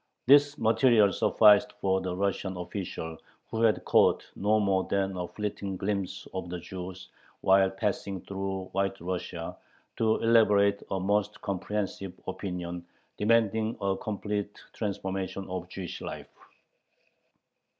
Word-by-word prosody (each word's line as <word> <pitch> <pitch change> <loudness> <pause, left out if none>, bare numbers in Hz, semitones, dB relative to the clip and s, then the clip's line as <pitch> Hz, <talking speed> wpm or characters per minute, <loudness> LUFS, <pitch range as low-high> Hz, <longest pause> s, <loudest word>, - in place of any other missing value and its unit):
This 145 +2 +6
material 110 -3 +4
sufficed 105 +2 +5
for 95 -1 0
the 90 -1 -3
Russian 95 -1 -1
official, 90 -3 -5 0.3
who 110 - -2
had 115 -2 +3
caught - - +4
no 105 +2 +2
more 95 -2 +2
than 95 -1 0
a 90 -1 -3
fleeting 100 -2 -4
glimpse 100 0 -3
of 95 -2 -4
the 90 - -4
Jews 90 +1 -8 0.3
while 95 0 +5
passing 95 -1 -2
through 95 -1 -4
White 95 0 -1
Russia, 85 -1 -4 0.4
to 110 -1 +3
elaborate 105 -3 +4
a 95 - -1
most 105 +2 0
comprehensive 100 -1 -3
"Opinion" 90 -2 -5 0.3
demanding 110 0 +2
a 100 -1 0
complete 105 -2 -3 0.2
transformation 95 -2 -3
of 90 -1 -5
Jewish 95 -2 -6
life. - - -7
95 Hz, 125 wpm, -29 LUFS, 95-105 Hz, 0.4 s, This